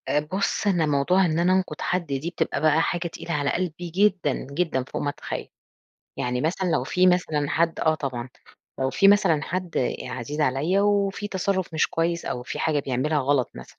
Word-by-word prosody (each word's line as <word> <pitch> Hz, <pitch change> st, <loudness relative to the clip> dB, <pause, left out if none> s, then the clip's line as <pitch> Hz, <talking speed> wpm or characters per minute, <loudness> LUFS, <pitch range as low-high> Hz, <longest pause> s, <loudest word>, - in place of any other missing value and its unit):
آآ 150 Hz, -, +3 dB
بُصّ، 190 Hz, +7 st, -1 dB
أنا 175 Hz, -5 st, +3 dB
موضوع 155 Hz, +6 st, +3 dB
إن 160 Hz, -1 st, 0 dB
أنا 180 Hz, +2 st, +3 dB
أنقُد 190 Hz, 0 st, -1 dB
حد 180 Hz, -1 st, 0 dB
دي 140 Hz, +2 st, -3 dB
بتبقى 175 Hz, -, -2 dB
بقى 155 Hz, +1 st, +4 dB
حاجة 175 Hz, +1 st, -1 dB
تقيلة 170 Hz, 0 st, -7 dB
على 145 Hz, -1 st, 0 dB
قلبي 175 Hz, -1 st, -3 dB
جدًا، 185 Hz, -4 st, +2 dB, 0.2 s
جدًا، 155 Hz, -4 st, 0 dB
فوق 130 Hz, -, -5 dB
ما 145 Hz, -, 0 dB
تتخيّل. -, -, -6 dB, 0.7 s
يعني 125 Hz, 0 st, -1 dB
مثلًا 180 Hz, +5 st, 0 dB
لو -, -, +1 dB
في 185 Hz, 0 st, +2 dB
مثلًا 160 Hz, -5 st, +2 dB
حد 165 Hz, 0 st, +1 dB
آه 160 Hz, -1 st, +3 dB
طبعًا 130 Hz, -5 st, -4 dB, 0.5 s
لو 130 Hz, 0 st, +1 dB
في 195 Hz, -, +4 dB
مثلًا 190 Hz, -7 st, +4 dB
حد 175 Hz, -6 st, -2 dB
عزيز 130 Hz, +4 st, -5 dB
عليَّ 150 Hz, +7 st, +2 dB
وفي 205 Hz, 0 st, +1 dB
تصرُّف 190 Hz, -3 st, -1 dB
مش 160 Hz, -, +3 dB
كويس 170 Hz, +1 st, -1 dB
أو 125 Hz, -, -3 dB
في -, -, -6 dB
حاجة 155 Hz, -2 st, +1 dB
بيعملها 140 Hz, +3 st, 0 dB
غلَط 135 Hz, -2 st, +1 dB
مثلًا. -, -, -12 dB
165 Hz, 190 wpm, -25 LUFS, 145-185 Hz, 0.7 s, بقى